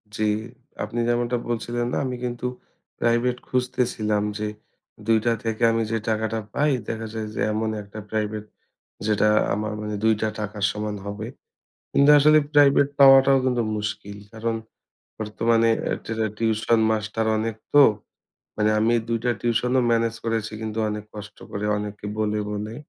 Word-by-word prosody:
জি, 110 -1 +1 0.5
আপনি 120 - -4
যেমনটা 120 0 +1
বলছিলেন 120 +1 -2
না - - 0
আমি 125 -1 -3
কিন্তু 120 0 -3 0.5
প্রাইভেট 120 +1 +1
খুঁজতেছিলাম 125 -5 0 0.2
যে, 105 - -1 0.6
২ 115 -1 +5
টা 120 - +3
থেকে 115 0 -3
আমি 115 0 +1
যে, 115 - +1
টাকাটা 110 +1 -1
পাই, 150 0 +2 0.2
দেখা 115 0 -4
যায় 110 -1 -4
যে, - - -4
এমন 110 0 -1
১ 100 - -13
টা 110 - -6
প্রাইভেট, 105 -1 -2 0.6
যেটা 105 0 +3 0.3
আমার 105 +1 -3
মানে 105 0 -4
২ 110 - +5
টা 110 - +2
টাকার 105 -1 -3
সমান 105 0 -4
হবে। 105 +2 -5 0.7
কিন্তু 140 +1 +5
আসলে 155 +2 +6 0.2
প্রাইভেট 140 -1 +5
পাওয়াটাও 135 0 +8
কিন্তু 125 -2 +1
মুশকিল। 105 -1 -5
কারণ 115 +1 -2 0.7
বর্তমানে 115 +2 +2 0.4
টেরা 110 -1 -1
টিউশন 110 0 +2
মাস্টার 110 +1 -1
অনেক 110 0 -2 0.2
তো। 145 -1 +9 0.7
মানে 105 0 +2
আমি 115 +2 +3
২ 115 0 0
টা 120 - +3
টিউশন 120 +1 0
ও - - +5
মেনেজ 115 0 +1
করেছি 115 -1 -1
কিন্তু 110 0 -4
অনেক 105 0 -4
কষ্ট 105 0 -9
করে, 100 +1 -4
অনেকে 105 0 -6
বলে, 105 0 0
বলে। 105 +2 -4
110 Hz, 155 wpm, -24 LUFS, 105-120 Hz, 0.7 s, তো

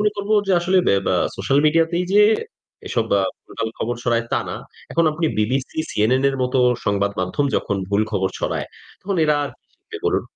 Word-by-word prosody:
মনে 210 0 +3
করব 200 +1 -5 0.2
যে 195 - +2
আসলে 185 +2 +2
বে - - +4
বে 95 - +2 0.2
সোশ্যাল 135 +9 +1
মিডিয়াতেই 165 +3 +2
যে 210 - +6 0.7
এসব 115 -2 0 0.4
ভুলভাল 115 - -4
খবর 120 +2 -1
ছড়ায় 120 -1 +1
তা - - +2
না। - - -4 0.4
এখন 170 - +2
আপনি 160 +1 -1
বিবিসি, 130 +7 -1
সিএনএন 125 +6 +2
এর 135 - -4
মতো 125 +1 0 0.3
সংবাদ 100 0 +1
মাধ্যম 95 +10 0
যখন 100 - -1
ভুল 105 +1 +2
খবর 95 -1 +1
ছড়ায়, - - -2 0.3
তখন 195 -1 -3
এরা 150 -1 +3
আর 140 - -5
কি - - -54
শিখবে - - -11
বলুন? - - +1
130 Hz, 190 wpm, -21 LUFS, 105-165 Hz, 0.7 s, যে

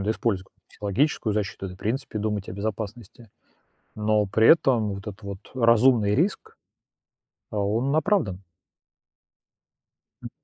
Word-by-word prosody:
виду 105 - 0
использовать 100 -4 -1
какую-то - - -45
психологическую 110 +2 -1
защиту, 100 -2 -3
да 90 - -7
и - - -10
в - - -19
принципе 115 +1 -3
думать 105 -2 -2
о - - -5
безопасности, 110 +2 -6 0.7
но 105 0 +2
при 110 +3 +3
этом 125 -9 +4
вот 100 +2 -7
этот 105 +1 -10
вот 100 -1 -6 0.2
разумный 115 -3 +4
риск, 175 - -1 0.9
а, 110 - -6
он 115 +9 0
оправдан. 155 - +1 1.8
М. - - -7
110 Hz, 140 wpm, -25 LUFS, 100-120 Hz, 1.8 s, этом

